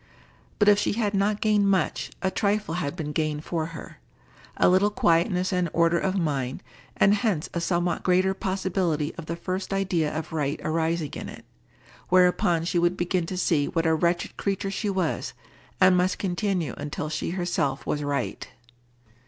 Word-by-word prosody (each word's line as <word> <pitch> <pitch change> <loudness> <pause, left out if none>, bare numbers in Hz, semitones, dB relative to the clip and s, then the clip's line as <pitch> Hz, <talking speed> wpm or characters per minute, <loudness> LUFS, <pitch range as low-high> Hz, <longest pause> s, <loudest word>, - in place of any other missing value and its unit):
But 205 - +3
if 205 -1 +6
she - - 0
had 210 -2 -1
not 205 +1 +1
gained 210 -2 +3
much, 190 -5 0
a 190 - +1
trifle 205 -2 0
had 165 -3 -2
been 155 -4 -4
gained 150 0 -2
for 160 -2 -2
her: 165 -2 -10 0.6
a - - +4
little 190 +3 +4
quietness 180 0 +1
and 180 -2 +1
order 170 0 +3
of 190 +1 -1
mind, 140 -8 -2 0.3
and 200 - +5
hence 205 -7 0
a 170 - -2
somewhat 175 0 0
greater 185 +1 +2
possibility 185 -5 -1
of 165 - -9
the 170 - -2
first 185 +3 -4
idea 180 -6 0
of 160 +1 -5
right 150 -1 -1
arising 160 -1 -1
in - - -6
it, - - -11 0.6
whereupon 180 -2 +3
she 175 0 +1
would 175 +1 +1
begin 175 -1 0
to 185 - -4
see 160 -5 +1
what 165 -1 -1
a 160 - +3
wretched 170 +2 0
creature 195 0 -2
she 205 +1 -2
was, 190 -4 -1 0.5
and 185 -1 +6
must 180 +1 +1
continue 185 -2 -1
until 145 +1 -4
she 150 -1 -3
herself 175 -6 -1
was 150 - -1
right. 145 -1 -2
175 Hz, 175 wpm, -26 LUFS, 160-190 Hz, 0.6 s, if